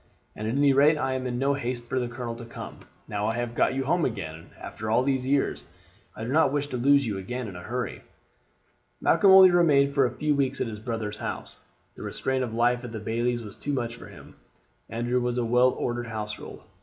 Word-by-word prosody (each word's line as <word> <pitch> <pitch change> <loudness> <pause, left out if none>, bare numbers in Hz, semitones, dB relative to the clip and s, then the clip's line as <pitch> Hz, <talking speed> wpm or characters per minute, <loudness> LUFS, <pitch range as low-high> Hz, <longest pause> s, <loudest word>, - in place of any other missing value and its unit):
At 110 - -4
any 140 +4 +3
rate 145 +3 +5
I 135 -2 -1
am 130 -1 -2
in 120 -1 -2
no 135 +2 +2
haste 125 -3 -3
for 130 +2 -1
the 125 - -1
colonel 120 -1 -5
to 120 - -8
come. 115 - -9 0.3
Now 105 0 -2
I 110 - 0
have 120 -1 -3
got 120 - +2
you 135 - 0
home 170 +5 +1
again 80 - -4
after 110 +1 -6
all 115 +3 +3
these 130 -1 0
years, 140 0 +1 0.5
I 110 - -6
do 120 - -3
not 155 -1 +4
wish 145 0 0
to 125 - -3
lose 140 +2 +4
you 105 -4 -2
again 125 +5 -5
in 95 - -8
a 90 - -7
hurry." 125 +5 -4 1.0
Malcolm 200 - +4
only 190 -1 +9
remained 145 -5 +4
for 135 -2 +4
a 120 - -8
few 150 0 +1
weeks 135 -2 0
at - - 0
his 110 -3 -6
brother's 110 -2 -4
house. - - -6 0.3
The - - -12
restraint 130 -1 -2
of 120 - -4
life 120 +2 +1
at 120 -1 -7
the 110 - -4
bailie's 120 +2 -1
was 105 -2 -9
too 145 - -4
much 120 -3 -2
for - - -11
him. - - -14 0.5
Andrew's 120 +2 -1
was 120 0 -1
a 120 - 0
well 125 +2 +4
ordered 120 -1 -3
household. 105 -2 -6
125 Hz, 230 wpm, -26 LUFS, 115-135 Hz, 1.0 s, only